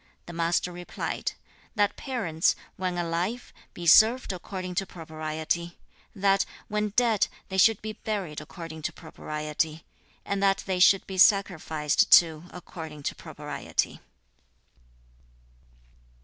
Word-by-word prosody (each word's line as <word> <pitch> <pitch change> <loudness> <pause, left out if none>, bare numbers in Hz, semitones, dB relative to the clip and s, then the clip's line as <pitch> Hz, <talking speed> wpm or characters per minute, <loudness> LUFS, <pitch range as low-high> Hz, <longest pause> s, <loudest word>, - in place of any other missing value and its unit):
The 175 - -9
Master 170 +1 0
replied, 175 0 -4 0.4
'That 205 -1 +2
parents, 180 - 0 0.2
when 185 -1 -2
alive, 175 +8 -2 0.2
be 175 - -7
served 220 +6 +6
according 185 0 -6
to 195 - -8
propriety; 160 +1 -4 0.4
that, 195 0 +3 0.2
when 210 0 -1
dead, 235 -4 +3 0.2
they 190 0 -1
should 225 +1 +5
be 215 0 -4
buried 195 -9 -4
according 160 0 -9
to - - -3
propriety; 155 -1 -4 0.4
and 200 0 -2
that 195 -1 +2
they 185 -2 -1
should 190 +1 +6
be 190 -1 -5
sacrificed 160 -7 +3
to 160 -1 +6
according 160 -4 -9
to - - -1
propriety.' - - -4
180 Hz, 120 wpm, -27 LUFS, 160-200 Hz, 0.4 s, served